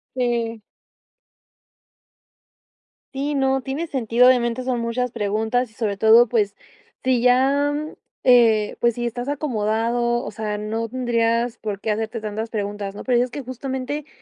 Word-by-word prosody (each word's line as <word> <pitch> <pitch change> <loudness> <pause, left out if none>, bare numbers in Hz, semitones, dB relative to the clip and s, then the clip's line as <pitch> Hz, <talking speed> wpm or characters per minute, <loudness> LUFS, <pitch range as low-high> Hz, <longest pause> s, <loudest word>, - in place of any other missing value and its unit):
Sí. 235 -3 -1 2.5
Sí, 285 +2 -2
no, 270 -1 +1
tiene 270 +6 -4
sentido. 245 -3 +3
Obviamente 245 -1 +3
son 250 -2 -1
muchas 240 +1 -2
preguntas 220 +3 -1
y 220 - -24
sobre 205 -4 -2
todo, 225 +2 +6
pues 210 -3 0 0.5
sí 255 -2 +2
ya, 270 +4 +3 0.5
eh, 230 -4 +4
pues 235 -1 +2
si 240 - -4
estás 245 +2 -4
acomodado, 240 -3 0
o - - -5
sea, 215 -2 -4
no 220 +2 -3
tendrías 235 -1 0
por 210 -2 -4
qué 220 - -1
hacerte 220 +1 -2
tantas 220 +1 -4
preguntas, 205 -2 -4
¿no? - - -8
Pero 245 -2 +2
dices 250 0 +1
que 285 - -6
justamente 265 +3 -5
235 Hz, 145 wpm, -22 LUFS, 220-255 Hz, 2.5 s, todo